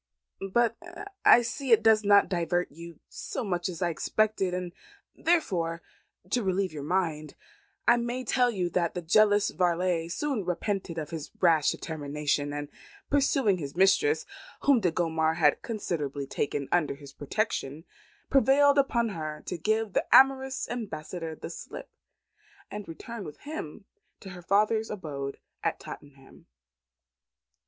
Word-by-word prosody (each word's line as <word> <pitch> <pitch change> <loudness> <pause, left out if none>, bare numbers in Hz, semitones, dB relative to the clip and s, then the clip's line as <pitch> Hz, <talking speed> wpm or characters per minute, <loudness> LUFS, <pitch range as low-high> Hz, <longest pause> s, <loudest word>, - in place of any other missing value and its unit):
But 235 +1 +2 0.5
I 240 - +7
see 265 +2 -4
it 225 -1 +6
does 220 -1 +5
not 205 0 +5
divert 175 -1 -1
you 170 +1 -11
so - - -5
much 180 -3 -2
as 180 0 -4
I 175 - +1
expected, 210 +2 0
and 180 -1 -4 0.4
therefore, 170 - 0 0.5
to 245 - +2
relieve 190 -2 0
your 150 - -6
mind, 155 -2 -2 0.5
I 240 - +6
may 240 +2 -3
tell 250 -1 +2
you 190 -6 -1
that 170 -1 0
the 180 - -4
jealous 205 +4 +4
varlet 175 -1 0
soon 275 -2 -2
repented 180 -1 -3
of 155 -2 -5
his 160 -2 -6
rash 160 -5 +4
determination, 145 -1 -2
and 145 0 -5 0.4
pursuing 270 -8 +2
his 140 -2 -6
mistress, 290 - +3 0.4
whom 280 -4 +4
Do 185 -5 +2
Gondomar 160 -1 0
had 150 -4 +3
considerately 150 - -3
taken 140 0 -2
under 165 -5 +1
his 140 -1 -13
protection, 155 -3 -3 0.5
prevailed 280 +1 +5
upon 235 -4 +1
her 155 -5 -5
to - - -4
give 215 +4 -1
the - - 0
amorous 265 0 +5
ambassador 170 -7 -5
the 165 - -8
slip, - - -9 0.8
and 210 -1 -6
return 205 +7 -8
with 150 -4 -10
him 220 - -7 0.4
to 190 - -9
her 180 -2 -9
father's 215 +4 +2
abode 145 -9 -5 0.3
at - - -1
Tottenham." 135 -2 -12
180 Hz, 145 wpm, -28 LUFS, 160-225 Hz, 0.8 s, I